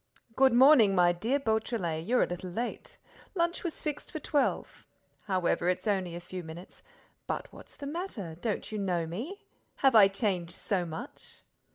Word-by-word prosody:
"Good 265 -1 +5
morning, 245 -6 +7
my 175 -1 +5
dear 225 +11 0
Beautrelet, 220 - -1
you're 250 +2 +4
a - - 0
little 180 +1 -5
late. 235 +7 -5 0.4
Lunch 340 -1 0
was 345 -3 -5
fixed 300 -2 -4
for 315 - -4
twelve. 290 -1 -1 0.4
However, 180 -3 +1
it's 180 - -1
only 190 -4 0
a - - -5
few 180 +1 -7
minutes—but 170 +2 -9
what's - - -14
the 285 - -8
matter? 280 - -5
Don't 220 -1 -2
you 215 - -3
know 180 -4 0
me? 240 - -6 0.3
Have 270 -2 +3
I 210 -3 +9
changed 195 -4 -2
so 185 -4 -1
much?" 160 0 -9
205 Hz, 165 wpm, -30 LUFS, 175-265 Hz, 0.4 s, I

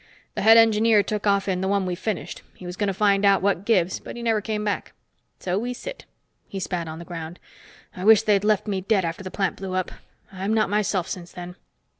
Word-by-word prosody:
The - - -3
head 225 +2 +7
engineer 220 -1 +5
took 210 +1 -3
off 200 -1 +2
in 185 -1 0
the 190 - -1
one 200 -1 +1
we 180 - -2
finished. 185 +1 -4
He 185 - -12
was 180 0 -6
going 205 +1 -1
to - - +1
find 200 0 +2
out 195 -2 +4
what 200 -1 +1
gives, 190 -6 +2
but - - -9
he 240 - -7
never 225 -2 +1
came 210 0 -3
back. 205 -1 -3 0.5
So 185 +1 -1
we 245 +2 -3
sit." - - -8 0.4
He 195 - -6
spat 175 -3 -3
on 160 0 -6
the 170 - -9
ground. 170 -1 -7 0.6
"I 180 - -6
wish 220 +1 +6
they'd 205 -2 +2
left 210 -2 +2
me 195 -3 -2
dead 195 -1 +1
after 165 +3 -4
the 185 - -5
plant 195 -1 -1
blew 190 -1 -5
up. 185 -1 -1 0.4
I'm 195 +3 -2
not 215 -3 +1
myself 205 -4 0
since 175 -2 -7
then." 180 0 -8
195 Hz, 235 wpm, -24 LUFS, 185-215 Hz, 0.6 s, head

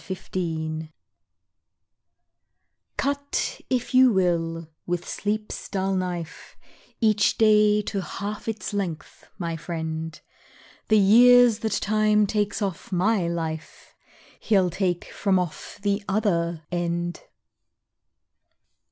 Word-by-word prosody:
Midnight 190 0 -7
Oil 160 -3 -2 2.1
Cut 285 0 -2
if 255 -1 -1
you 255 -1 +7
will, 170 -4 0 0.2
with 175 0 -2
Sleep's 210 +1 -3
dull 195 -1 -1
knife, 180 -3 -4 0.4
Each 215 -3 +3
day 210 -1 +4
to 200 -1 -3
half 200 +6 -6
its 215 -3 -4
length, 185 -6 -5
my 170 -3 -3
friend, 160 -1 -5 0.7
The 215 - +4
years 240 +3 +7
that 220 -2 -2
Time 215 0 +2
takes 210 +1 -1
off 190 -2 -4
my 190 0 +2
life, 160 -2 -5 0.5
He'll 190 -5 +2
take 180 -1 -1
from 195 -2 +1
off 180 -4 -4
the 200 0 0
other 170 -6 0
end! 175 0 -2
190 Hz, 105 wpm, -25 LUFS, 170-215 Hz, 2.1 s, you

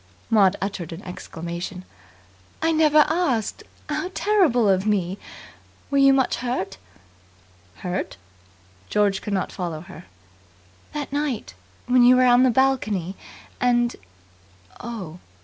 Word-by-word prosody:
Maud 200 -3 +5
uttered 190 -4 -4
an 165 +4 -8
exclamation. 175 +1 -7 0.7
"I 325 +1 +1
never 305 -1 +5
asked! 295 - 0 0.3
How 365 - -2
terrible 345 - +3
of 190 +1 +2
me. 195 -2 0 0.7
Were 280 - +3
you 275 0 +7
much 265 -2 +2
hurt?" 240 - -3 1.1
"Hurt?" 180 - -3 0.7
George 200 -2 +1
could 210 - -4
not 190 -2 -1
follow 170 -4 -4
her. 180 - -12 0.9
"That 290 -2 -5
night. 285 - -2 0.3
When 250 0 +4
you 250 +1 +7
were 255 0 +4
on 245 0 +6
the 260 - +5
balcony, 220 -8 +1 0.4
and 240 -1 +2 0.4
" 90 -1 -30
"Oh!" 195 -8 -7
215 Hz, 125 wpm, -23 LUFS, 185-265 Hz, 1.1 s, you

